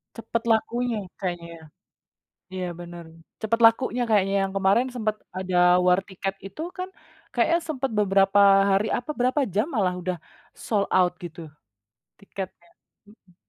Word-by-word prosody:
Cepet 230 Hz, 0 st, -3 dB
lakunya 230 Hz, +1 st, +1 dB, 0.2 s
kayaknya 175 Hz, -3 st, -4 dB
ya? 160 Hz, -, -16 dB, 0.9 s
Iya, 185 Hz, -1 st, -3 dB
bener, 175 Hz, 0 st, -9 dB, 0.4 s
cepet 230 Hz, +1 st, 0 dB
lakunya 245 Hz, +2 st, +3 dB
kayaknya 200 Hz, -2 st, +3 dB
yang 195 Hz, -, -6 dB
kemarin 195 Hz, +6 st, +3 dB
sempet 215 Hz, -3 st, -2 dB, 0.2 s
ada 180 Hz, -1 st, +3 dB
war 180 Hz, +1 st, +5 dB
tiket 195 Hz, 0 st, -4 dB
itu 195 Hz, -, -8 dB, 0.2 s
kan 365 Hz, +1 st, -4 dB, 0.4 s
kayaknya 335 Hz, -, +3 dB
sempet 270 Hz, -4 st, -2 dB
beberapa 195 Hz, 0 st, +3 dB, 0.3 s
hari 195 Hz, +2 st, +2 dB
apa 245 Hz, +5 st, -2 dB
berapa 255 Hz, +4 st, +2 dB
jam 200 Hz, +5 st, +1 dB
malah 190 Hz, -6 st, +1 dB
udah 180 Hz, 0 st, -2 dB, 0.5 s
sold 205 Hz, -3 st, +1 dB
out 180 Hz, -1 st, +4 dB
gitu 170 Hz, 0 st, -8 dB, 0.8 s
tiketnya, 190 Hz, -3 st, -8 dB, 0.4 s
mhm. 195 Hz, -4 st, -23 dB
195 Hz, 140 wpm, -25 LUFS, 180-230 Hz, 0.9 s, war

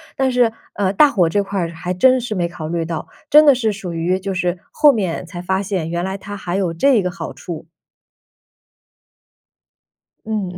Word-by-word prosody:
但 265 Hz, -2 st, +1 dB
是， 245 Hz, -2 st, +3 dB, 0.2 s
呃， 195 Hz, -2 st, 0 dB
大 295 Hz, +9 st, +6 dB
火 180 Hz, -9 st, +2 dB
这 200 Hz, +4 st, +1 dB
块 200 Hz, 0 st, -3 dB
儿 170 Hz, -2 st, -1 dB
还 175 Hz, +2 st, -4 dB
真 255 Hz, +8 st, +4 dB
是 240 Hz, -2 st, -4 dB
没 175 Hz, -4 st, 0 dB
考 165 Hz, -3 st, -7 dB
虑 165 Hz, +1 st, -1 dB
到， 165 Hz, -1 st, -5 dB, 0.2 s
真 300 Hz, +1 st, +7 dB
的 285 Hz, -, +8 dB
是 235 Hz, -4 st, 0 dB
属 195 Hz, -4 st, -6 dB
于 170 Hz, +3 st, 0 dB
就 195 Hz, 0 st, -4 dB
是 180 Hz, -1 st, -1 dB
后 300 Hz, -1 st, +6 dB
面 190 Hz, -10 st, -2 dB
才 175 Hz, 0 st, -9 dB
发 190 Hz, +2 st, -1 dB
现 190 Hz, -5 st, -2 dB
原 170 Hz, 0 st, -2 dB
来 190 Hz, +1 st, -3 dB
它 205 Hz, +1 st, -8 dB
还 180 Hz, -3 st, -4 dB
有 185 Hz, -4 st, 0 dB
这 225 Hz, +5 st, +3 dB
个 180 Hz, -, -1 dB
好 195 Hz, -, -6 dB
处。 165 Hz, -2 st, -8 dB, 2.6 s
嗯。 200 Hz, -5 st, -3 dB
190 Hz, 210 characters per minute, -19 LUFS, 175-215 Hz, 2.6 s, 的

